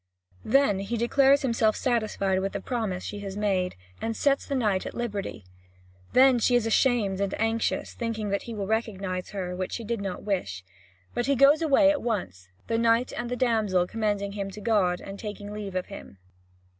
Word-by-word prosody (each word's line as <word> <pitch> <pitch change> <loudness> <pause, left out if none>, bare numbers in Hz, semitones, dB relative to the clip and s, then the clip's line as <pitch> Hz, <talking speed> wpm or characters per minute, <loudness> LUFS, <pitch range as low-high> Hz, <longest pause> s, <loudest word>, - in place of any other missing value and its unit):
Then 225 -5 +3
he 205 +4 -3
declares 270 +4 +4
himself 230 -4 +2
satisfied 215 -6 0
with 195 +1 -2
the - - -2
promise 220 -7 -3
she 205 - -5
has 200 -1 -6
made, 190 -3 0 0.3
and 225 0 -2
sets 280 -1 +1
the 280 - -1
knight 210 -7 +1
at - - -8
liberty. 205 - -4 0.7
Then 260 -1 +6
she 245 +2 +3
is 240 -2 +2
ashamed 225 -4 +2
and 200 -1 -2
anxious, 225 +1 0
thinking 225 -3 -3
that 200 0 0
he 235 - -7
will 200 -2 -3
recognise 195 -4 -2
her, 185 -3 -4
which 185 0 -4
she 235 - -4
did 230 -1 -3
not 195 -2 -4
wish. 100 - -2 0.5
But 240 - -1
he 280 - +3
goes 280 +4 +6
away 295 -1 +5
at 295 - -2
once, 95 - -3 0.2
the 225 0 0
knight 230 +1 +2
and 240 0 -4
the 250 - -1
damsel 220 -7 +2
commending 205 -1 -1
him 200 -1 -4
to 195 - -9
God, 200 -5 +1
and 195 0 -8
taking 210 -1 -6
leave 205 -3 -6
of 185 - -1
him. 200 - -11
215 Hz, 195 wpm, -27 LUFS, 195-235 Hz, 0.7 s, Then